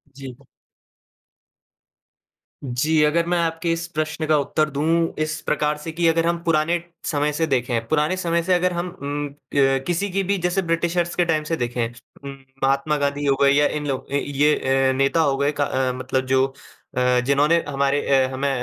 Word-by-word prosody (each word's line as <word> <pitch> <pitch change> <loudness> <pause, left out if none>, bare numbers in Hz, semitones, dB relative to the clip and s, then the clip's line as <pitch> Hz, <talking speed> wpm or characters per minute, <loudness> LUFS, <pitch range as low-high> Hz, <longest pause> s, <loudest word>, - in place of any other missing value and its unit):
जी। 135 -3 -9 2.3
जी, 145 +5 +1
अगर 165 +3 +2
मैं 175 - +2
आपके 165 0 -1
इस 165 +1 -2
प्रश्न 155 0 -2
का 155 -1 +4
उत्तर 155 +2 0
दूँ, 165 +4 0
इस 155 0 -3
प्रकार 150 0 0
से 150 +2 -7
कि 170 +1 0
अगर 165 0 +2
हम 170 0 +1
पुराने 165 +1 +1 0.2
समय 150 -1 0
से 160 +1 0
देखें, 120 -4 -1
पुराने 155 +4 +1
समय 170 -2 0
से 185 - +1
अगर 180 0 +2
हम 175 +1 -2
उम, 145 +1 -3 0.3
क 135 -1 +3
किसी 180 +4 -1
की 195 +1 0
भी 200 +1 0
जैसे 180 +2 +1
ब्रिटिशर्स 170 0 -1
के 175 - +2
टाइम 155 -2 0
से 165 +2 -2
देखें 120 -1 -1 0.4
उम, 140 - -6 0.3
महात्मा 135 +3 +1
गाँधी 145 0 -1
हो 140 -1 +3
गए 140 0 +5
या 145 +1 +4
इन 150 -1 -4
लोग 135 0 -4
अ, - - -1
ये 145 +1 +2 0.3
अ, - - +3
नेता 135 +4 +2
हो 140 -3 +1
गए 140 +1 +1
क - - +2
अ, 130 -2 0
मतलब 130 +1 -2
जो 130 0 +3 0.5
अ, 125 0 +3
जिन्होंने 150 +5 +3
हमारे 140 0 +1
अ, 135 -1 +3
हमें 140 +2 -1
150 Hz, 190 wpm, -22 LUFS, 135-165 Hz, 2.3 s, गए